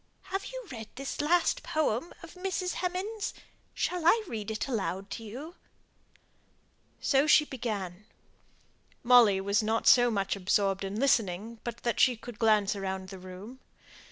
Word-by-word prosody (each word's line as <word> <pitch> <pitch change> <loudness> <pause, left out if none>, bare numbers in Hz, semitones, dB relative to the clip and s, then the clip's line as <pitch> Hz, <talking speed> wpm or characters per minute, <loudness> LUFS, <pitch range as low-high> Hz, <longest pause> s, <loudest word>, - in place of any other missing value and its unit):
Have 390 +1 -2
you - - -7
read 225 -3 -7
this 275 +3 -4
last 335 +3 +2
poem 310 -1 -1
of 330 - -10
Mrs. 365 0 -2
Hemans? 385 +4 -3 0.4
Shall 360 -2 -1
I 430 +7 +5
read 215 - -5
it 220 +3 -3
aloud 195 -5 -3
to 230 - -5
you?" 265 +10 -8 1.5
So 275 +1 +2
she 300 0 +6
began. 210 -8 -5 1.0
Molly 235 -5 +6
was 200 +3 +1
not 220 +1 0
so 245 -1 +7
much 200 -3 -1
absorbed 195 0 +1
in 195 +2 -4
listening 225 -4 +1
but 235 -1 -6
that 235 - -1
she 255 - +5
could 235 -1 -10
glance 215 -3 +3
round 190 -1 -4
the 190 -1 -9
room. 185 +7 -10
230 Hz, 150 wpm, -29 LUFS, 200-300 Hz, 1.5 s, so